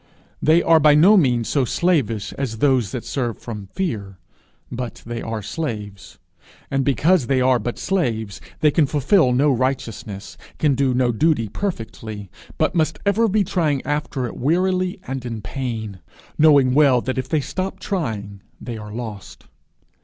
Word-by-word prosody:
They 160 Hz, +3 st, +4 dB
are 165 Hz, -1 st, +5 dB
by 150 Hz, -1 st, +6 dB
no 185 Hz, +8 st, +7 dB
means 125 Hz, -, +2 dB
so 140 Hz, -, +1 dB
slavish 125 Hz, -, 0 dB
as 125 Hz, -5 st, -4 dB
those 130 Hz, -6 st, +2 dB
that 125 Hz, -, -5 dB
serve 120 Hz, -5 st, -2 dB
from 105 Hz, -4 st, -8 dB
fear, 100 Hz, -, -4 dB, 0.5 s
but 125 Hz, -2 st, -6 dB
they 115 Hz, 0 st, -5 dB
are 110 Hz, -2 st, -4 dB
slaves; 105 Hz, -8 st, -6 dB, 0.5 s
and 135 Hz, 0 st, +1 dB
because 145 Hz, +2 st, +2 dB
they 135 Hz, 0 st, +2 dB
are 130 Hz, -1 st, +3 dB
but 120 Hz, -, -4 dB
slaves, 115 Hz, -, -2 dB, 0.2 s
they 150 Hz, -, +5 dB
can 150 Hz, -1 st, +3 dB
fulfil 145 Hz, +1 st, +3 dB
no 140 Hz, +4 st, +3 dB
righteousness, 120 Hz, -6 st, -3 dB, 0.2 s
can 150 Hz, -3 st, +2 dB
do 130 Hz, -1 st, +1 dB
no 125 Hz, -1 st, +2 dB
duty 115 Hz, -1 st, +1 dB
perfectly, 110 Hz, -, -5 dB, 0.3 s
but 155 Hz, +2 st, +1 dB
must 160 Hz, -2 st, +1 dB
ever 210 Hz, +3 st, +3 dB
be 210 Hz, 0 st, +2 dB
trying 155 Hz, -7 st, 0 dB
after 145 Hz, -2 st, -2 dB
it -, -, -6 dB
wearily 185 Hz, -, 0 dB
and 130 Hz, -1 st, -5 dB
in 115 Hz, -3 st, -5 dB
pain, 110 Hz, -4 st, -5 dB, 0.4 s
knowing 145 Hz, -5 st, +5 dB
well 135 Hz, -4 st, +5 dB
that 130 Hz, +1 st, -2 dB
if 130 Hz, 0 st, -4 dB
they 155 Hz, -, +1 dB
stop 185 Hz, +7 st, -4 dB
trying, 105 Hz, -, -4 dB, 0.2 s
they 120 Hz, -2 st, -6 dB
are 105 Hz, 0 st, -9 dB
lost. 110 Hz, -3 st, -8 dB
130 Hz, 160 wpm, -21 LUFS, 115-155 Hz, 0.5 s, no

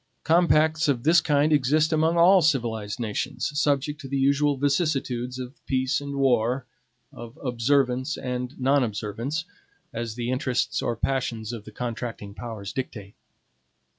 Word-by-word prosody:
Compacts 160 Hz, -1 st, +3 dB
of 130 Hz, -5 st, 0 dB
this 165 Hz, +2 st, +5 dB
kind 150 Hz, +1 st, +2 dB
exist 150 Hz, +3 st, +3 dB
among 160 Hz, +2 st, +2 dB
all 180 Hz, +3 st, +6 dB
civilized 115 Hz, -8 st, 0 dB
nations, 120 Hz, +6 st, -2 dB
subject 145 Hz, 0 st, 0 dB
to 135 Hz, -, -8 dB
the 140 Hz, +1 st, -2 dB
usual 140 Hz, +1 st, +2 dB
vicissitudes 135 Hz, -4 st, 0 dB
of 130 Hz, +2 st, -8 dB
peace 130 Hz, +1 st, 0 dB
and 140 Hz, 0 st, -5 dB
war, 125 Hz, -1 st, +1 dB, 0.5 s
of 120 Hz, +4 st, -10 dB
observance 130 Hz, +2 st, +1 dB
and 125 Hz, +1 st, -4 dB
non 135 Hz, +1 st, +3 dB
observance, 115 Hz, +8 st, -3 dB, 0.5 s
as 115 Hz, -1 st, -4 dB
the 120 Hz, +1 st, -2 dB
interests 130 Hz, -1 st, 0 dB
or 120 Hz, -, -1 dB
passions 115 Hz, -3 st, -2 dB
of 110 Hz, -3 st, -7 dB
the 110 Hz, -, -10 dB
contracting 115 Hz, -3 st, -5 dB
powers 110 Hz, -3 st, -7 dB
dictate. 105 Hz, -7 st, -6 dB
130 Hz, 140 wpm, -25 LUFS, 120-145 Hz, 0.5 s, all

